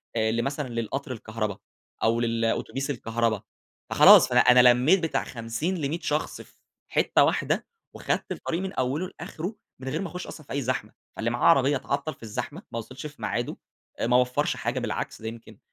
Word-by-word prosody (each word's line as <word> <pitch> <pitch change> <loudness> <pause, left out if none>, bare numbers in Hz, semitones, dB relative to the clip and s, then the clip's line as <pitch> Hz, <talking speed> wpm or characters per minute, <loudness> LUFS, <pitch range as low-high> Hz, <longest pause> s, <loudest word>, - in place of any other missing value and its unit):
آآ 110 -1 +2
لمثلًا 135 +5 -1
للقطر 120 +4 -3
الكهربا، 110 -3 -4 0.5
أو 115 +1 +3
للأتوبيس 115 +4 -1
الكهربا. 115 -4 -1 0.5
فخلاص، - - +8
فأنا - - +5
أنا 125 0 +7
لمِّيت 145 +11 +4
بتاع 165 - 0
50 115 +10 -3
ل100 155 +2 -2
شخص 150 0 -2
في - - -17 0.3
حتّة - - +3
واحدة، - - 0 0.3
وخدت - - -2
الطريق 170 +2 -3
من 190 0 -4
أوِّله 135 +8 -1
لآخره 180 +7 -5 0.2
من 130 0 -5
غير - - -2
ما 195 - -3
أخُش 180 +2 -7
أصلًا 155 - -10
في - - -8
أي 140 - 0
زحمة. 125 -4 -2 0.2
فاللي 115 - -1
معاه 120 +1 -1
عربية 140 -2 +5
اتعطّل 140 +3 -3
في 125 - -19
الزحمة، 130 - -5
ما 115 - -3
وصلش 130 +5 -9
في 150 - -15
ميعاده، - - -2 0.5
ما 125 +1 +4
وفَّرش 125 +3 +1
حاجة، 125 0 -2
بالعكس 120 -1 -4
ده 110 - -5
يمكن 115 0 -9
125 Hz, 180 wpm, -26 LUFS, 115-145 Hz, 0.5 s, فخلاص